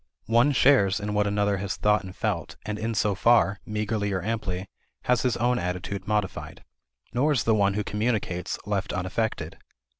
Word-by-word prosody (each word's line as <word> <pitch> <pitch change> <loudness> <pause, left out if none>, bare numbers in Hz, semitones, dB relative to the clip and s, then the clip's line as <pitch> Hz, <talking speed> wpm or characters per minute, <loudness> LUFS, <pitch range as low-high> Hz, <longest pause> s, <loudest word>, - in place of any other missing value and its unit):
One 120 +6 +4
shares 125 -8 +4
in 105 0 -3
what 105 0 +2
another 100 0 +1
has 95 0 -3
thought 105 0 +2
and 95 -1 -9
felt 100 -7 -2
and 105 0 -3
in 115 +1 -2
so 105 -1 +2
far, 100 -2 +3
meagerly 105 -1 -1
or 95 -2 -2
amply, 100 -4 -2 0.4
has 125 -1 +2
his 125 -3 +1
own 120 +2 +1
attitude 90 +3 -4
modified. 105 -4 -2 0.5
Nor 145 +5 +2
is 130 - +1
the 115 - +3
one 100 -2 +2
who 105 - 0
communicates 105 -5 -1
left 100 -1 -2
unaffected. 90 -2 -2
105 Hz, 175 wpm, -26 LUFS, 95-115 Hz, 0.5 s, One